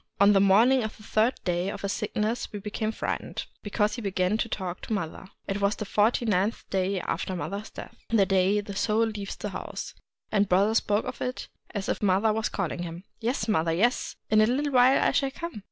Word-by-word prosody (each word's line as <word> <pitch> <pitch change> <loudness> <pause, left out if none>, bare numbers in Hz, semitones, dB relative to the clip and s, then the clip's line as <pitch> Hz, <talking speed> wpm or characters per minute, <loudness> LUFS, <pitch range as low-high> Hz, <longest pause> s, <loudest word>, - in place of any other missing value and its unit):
On 200 +1 +7
the 195 - +5
morning 225 +7 +5
of 220 - -5
the 215 - -15
third 220 +4 +2
day 180 +1 0
of - - -6
his 200 - 0
sickness 215 +2 -2
we 210 - -5
became 215 +2 -3
frightened - - -4
— - - -39
because 210 0 0
he 235 - -5
began 190 -1 0
to 230 - -1
talk 185 -4 -4
to - - -4
mother. 190 -1 -4 0.2
It 195 +1 -2
was 200 +1 +2
the 215 - -5
forty 215 +4 +2
ninth 205 +1 0
day 190 0 0
after 185 +3 -3
mother's 195 +6 -4
death, - - -10
— - - -52
the 215 -4 +4
day 195 +2 +2
the 200 -1 -8
Soul 220 +3 +2
leaves 210 -3 -5
the - - -5
house; - - -6 0.2
— - - -49
and 205 -2 +2
brother 195 +4 +4
spoke 210 -1 +1 0.6
as 205 -3 -4
if - - -1
mother 205 +2 +3
was 220 0 -1
calling 175 -2 -3
him: 170 +1 -6
— - - -51
' - - -41
Yes, 230 -1 -1
mother, 165 -6 +2
yes! 235 +9 +1
— - - -55
in 215 0 +6
a 215 - +5
little 280 +4 0
while 255 +1 +5
I - - +3
shall 275 - +1
come 335 -2 -6
205 Hz, 235 wpm, -27 LUFS, 195-220 Hz, 0.6 s, On